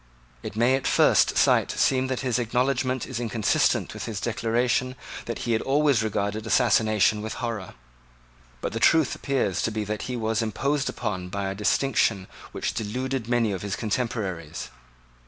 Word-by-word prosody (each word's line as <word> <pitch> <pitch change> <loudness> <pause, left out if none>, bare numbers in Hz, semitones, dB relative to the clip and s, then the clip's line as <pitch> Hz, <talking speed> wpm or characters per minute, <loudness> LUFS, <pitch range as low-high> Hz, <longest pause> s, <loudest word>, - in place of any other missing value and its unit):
It - - -7
may 120 +3 +3
at 135 - -2
first - - +4
sight - - +4
seem 130 -1 +2
that 130 -1 -2
this 125 -2 0
acknowledgment 125 +2 0
is 130 -3 -5
inconsistent 115 -2 +1
with - - -6
his 110 -3 -4
declaration 120 +2 0 0.3
that 115 - -4
he 120 - 0
had 110 - +2
always 140 -2 +2
regarded 105 0 -2
assassination 110 -3 +3
with 110 +1 -5
horror. 115 -6 -5 0.9
But - - -3
the 115 - -2
truth 160 +2 +4
appears 125 - -1
to - - 0
be 110 -1 -3
that 105 0 -4
he 125 - -2
was 110 -2 0
imposed 135 +6 -1
upon 90 -3 -4
by 100 0 -3
a - - -3
distinction 105 -1 +1 0.3
which - - -3
deluded 125 +2 -3
many 120 -3 +2
of 95 -3 -4
his 100 -2 -3
contemporaries. 100 -7 -3
115 Hz, 165 wpm, -25 LUFS, 105-130 Hz, 0.9 s, first